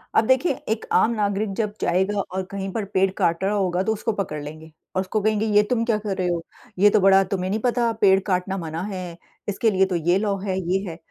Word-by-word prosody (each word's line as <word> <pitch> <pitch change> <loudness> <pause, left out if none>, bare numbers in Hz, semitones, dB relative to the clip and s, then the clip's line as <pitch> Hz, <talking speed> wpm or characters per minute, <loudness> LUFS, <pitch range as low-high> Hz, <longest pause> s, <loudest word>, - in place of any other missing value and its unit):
अब 220 - +4
देखिए, 260 +4 +3 0.2
एक 220 0 -1
आम 230 - +4
नागरिक 205 -1 -1
जब 210 -2 -1
जाएगा 190 +4 +1
और 190 -1 -3
कहीं 195 -1 -4
पर 220 -3 -2
पेड़ 190 0 +3
काट 170 +2 +1
रहा 200 +2 +1
होगा 185 -3 0
तो 220 +2 +1
उसको 225 +2 -2
पकड़ 160 -7 -4
लेंगे 155 +2 -10 0.2
और 185 - +2
उसको 195 +3 -2
कहेंगे, 215 +1 +1
"ये 210 -1 +4
तुम 235 -2 +1
क्या 225 -3 +1
कर 200 -3 -4
रहे 185 - 0
हो? 175 -1 -1 0.4
ये 205 - +7
तो 210 - +3
बड़ा 195 0 +6
तुम्हें 185 -1 -1
नहीं 215 +3 0
पता, 240 -1 +1
पेड़ 195 -1 +6
काटना 190 0 0
मना 165 -1 -4
है? 180 -2 -6 0.3
इसके 220 +3 +1
लिए 190 -1 +3
तो 185 - -2
ये 175 +2 +2
लॉ 200 -1 0
है, 190 -2 -2
ये 185 +2 0
है।" 165 - -8
195 Hz, 245 wpm, -23 LUFS, 185-210 Hz, 0.4 s, ये